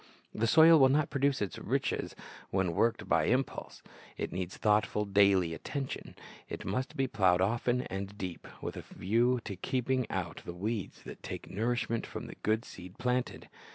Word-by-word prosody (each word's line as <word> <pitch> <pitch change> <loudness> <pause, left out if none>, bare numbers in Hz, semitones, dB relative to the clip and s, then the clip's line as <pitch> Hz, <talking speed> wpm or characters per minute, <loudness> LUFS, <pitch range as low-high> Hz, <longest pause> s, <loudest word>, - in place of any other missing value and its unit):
The 115 +2 0
soil 160 +4 +8
will 135 -1 +7
not 145 +2 +2
produce 140 -4 +1
its 100 - -5
riches - - -1 0.3
when 95 -3 0
worked 115 +7 +1
by - - +3
impulse. 130 +3 -1 0.3
It - - -3
needs 90 0 -4
thoughtful, 105 0 +2
daily 100 -4 +4
attention. 135 - -5 0.3
It - - -6
must 130 +1 -2
be 135 - +2
plowed 95 -8 +3
often 120 +5 +1
and 100 -1 -5
deep, 90 -4 -6 0.2
with - - -4
a - - -5
view 120 +5 +1
to 100 - -4
keeping 130 +5 -1
out 90 -3 -3
the 85 - -7
weeds 105 +2 -4
that - - -10
take - - -7
nourishment 115 +2 -1
from 110 +2 -6
the - - -9
good 110 +3 +1
seed 90 0 -11
planted. 125 +1 -1
110 Hz, 170 wpm, -31 LUFS, 95-125 Hz, 0.3 s, soil